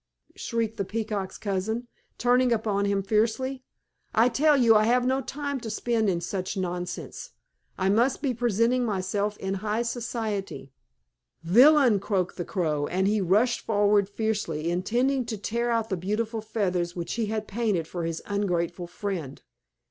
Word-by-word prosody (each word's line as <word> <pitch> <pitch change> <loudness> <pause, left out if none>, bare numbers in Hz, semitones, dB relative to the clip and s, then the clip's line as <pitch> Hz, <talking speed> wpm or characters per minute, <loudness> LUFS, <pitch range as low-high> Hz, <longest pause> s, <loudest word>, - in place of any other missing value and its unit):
shrieked 225 -1 -2
the 200 - 0
Peacock's 205 -2 -3
cousin, 220 +4 -2 0.3
turning 250 +1 +3
upon 210 -3 +1
him 200 -1 0
fiercely. 230 +6 0 0.5
"I 230 +3 +5
tell 295 +3 +3
you 230 -4 +5
I 215 0 +5
have 245 +2 +3
no 260 +1 +1
time 285 0 -4
to 230 - -6
spend 225 -1 0
in 170 -2 0
such 185 +2 -3
nonsense. 180 -1 -5 0.4
I 190 - 0
must 235 +6 +2
be 275 -4 -1
presenting 240 +1 +1
myself 205 0 -1
in 190 0 -3
high 215 +2 0
society." 220 - -4 0.7
"Villain!" 245 - +6
croaked 190 -2 -1
the 175 - -3
Crow, 150 -6 -1
and 190 +2 0
he 210 0 +2
rushed 210 +7 +2
forward 205 -2 +2
fiercely, 200 -7 -2
intending 245 +9 +1
to 225 -2 -4
tear 235 +4 -2
out 230 -1 0
the 190 - -1
beautiful 215 +5 -2
feathers 185 -5 -1
which 170 -2 -4
he 230 -2 -1
had 215 0 -3
painted 205 -7 -1
for 175 0 -4
his 165 0 -3
ungrateful 175 -4 -1
friend. 175 -7 -5
210 Hz, 155 wpm, -26 LUFS, 190-235 Hz, 0.7 s, Villain